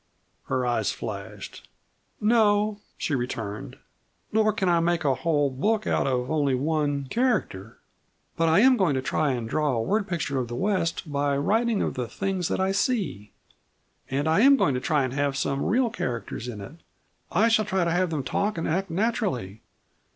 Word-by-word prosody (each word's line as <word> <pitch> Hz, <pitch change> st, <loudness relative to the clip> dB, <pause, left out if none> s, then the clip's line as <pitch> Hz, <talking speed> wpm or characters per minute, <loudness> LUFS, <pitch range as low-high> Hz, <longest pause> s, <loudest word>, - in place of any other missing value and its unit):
Her 130 Hz, -1 st, -1 dB
eyes 120 Hz, -4 st, 0 dB
flashed. -, -, -8 dB, 0.5 s
"No," 210 Hz, -1 st, +3 dB, 0.2 s
she 155 Hz, -, -2 dB
returned. 115 Hz, -5 st, -4 dB, 0.6 s
"Nor 215 Hz, 0 st, +3 dB
can 200 Hz, -3 st, -1 dB
I 170 Hz, -1 st, +4 dB
make 170 Hz, -1 st, 0 dB
a 135 Hz, -, +4 dB
whole 145 Hz, +1 st, +1 dB
book 210 Hz, +11 st, 0 dB
out -, -, +1 dB
of 125 Hz, 0 st, -1 dB
only 145 Hz, -4 st, +2 dB
one 145 Hz, 0 st, 0 dB
character. 205 Hz, -, -1 dB, 0.6 s
But 165 Hz, 0 st, +2 dB
I 165 Hz, +5 st, +5 dB
am 260 Hz, +1 st, +6 dB
going 180 Hz, -, +2 dB
to 130 Hz, -, -1 dB
try 150 Hz, +2 st, 0 dB
and 120 Hz, -2 st, -3 dB
draw 150 Hz, +3 st, 0 dB
a 115 Hz, -, 0 dB
word 205 Hz, -, 0 dB
picture 155 Hz, -6 st, -2 dB
of 125 Hz, -, -2 dB
the 120 Hz, -, -5 dB
West 170 Hz, -2 st, -1 dB
by 140 Hz, 0 st, 0 dB
writing 220 Hz, +8 st, +1 dB
of -, -, -2 dB
the 125 Hz, -2 st, -3 dB
things 190 Hz, +3 st, -2 dB
that -, -, -2 dB
I 190 Hz, 0 st, +1 dB
see. 190 Hz, -, -1 dB, 0.8 s
And 140 Hz, +3 st, -1 dB
I 160 Hz, +4 st, +3 dB
am 275 Hz, +4 st, +7 dB
going 145 Hz, -, +2 dB
to 125 Hz, -, -1 dB
try 150 Hz, -1 st, +1 dB
and 130 Hz, -1 st, -3 dB
have 140 Hz, -1 st, 0 dB
some 135 Hz, +1 st, -1 dB
real 240 Hz, 0 st, +1 dB
characters 120 Hz, -, -4 dB
in 110 Hz, -4 st, -6 dB
it. 135 Hz, +11 st, -10 dB, 0.5 s
I 210 Hz, +7 st, +3 dB
shall 220 Hz, -2 st, +3 dB
try 190 Hz, -3 st, 0 dB
to 170 Hz, -, 0 dB
have 180 Hz, +1 st, +1 dB
them 155 Hz, -4 st, -2 dB
talk 205 Hz, +8 st, -1 dB
and 165 Hz, -, -2 dB
act 185 Hz, +4 st, -1 dB
naturally." 180 Hz, -, -1 dB
160 Hz, 190 wpm, -26 LUFS, 130-205 Hz, 0.8 s, am